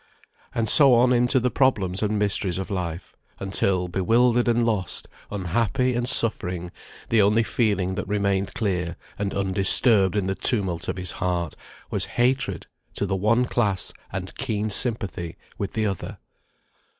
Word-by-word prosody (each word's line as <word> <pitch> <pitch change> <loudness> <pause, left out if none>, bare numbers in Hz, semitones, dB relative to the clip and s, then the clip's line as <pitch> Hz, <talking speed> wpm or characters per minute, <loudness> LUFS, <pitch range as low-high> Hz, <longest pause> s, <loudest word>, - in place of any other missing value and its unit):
And 115 -1 0
so 135 +2 +7
on 125 +2 +4
into 125 +2 +3
the 125 0 0
problems 100 -9 +1
and 105 0 0
mysteries 100 -3 -1
of 95 +2 -5
life, 90 -2 -5 0.2
until, 95 -1 0
bewildered 115 +7 +2
and 120 0 +2
lost, 105 -7 -2 0.2
unhappy 110 +7 0
and 120 +1 -1
suffering, 90 -8 -2 0.4
the 115 -2 +4
only 105 +3 +3
feeling 100 -6 0
that 100 0 -4
remained 100 -1 -1
clear 90 -5 -2 0.2
and 100 -1 -2
undisturbed 100 +1 +4
in 100 -3 0
the 95 - -1
tumult 95 -6 0
of - - -3
his 90 -1 -1
heart, 85 -4 -2 0.4
was - - -1
hatred 120 -7 0 0.3
to - - -1
the 95 -1 -1
one 110 +6 +2
class 105 -6 -1 0.2
and - - -5
keen 105 0 -2
sympathy 100 -7 -2 0.2
with 100 - -3
the 110 -1 -1
other. 100 0 -4
100 Hz, 150 wpm, -24 LUFS, 95-115 Hz, 0.4 s, so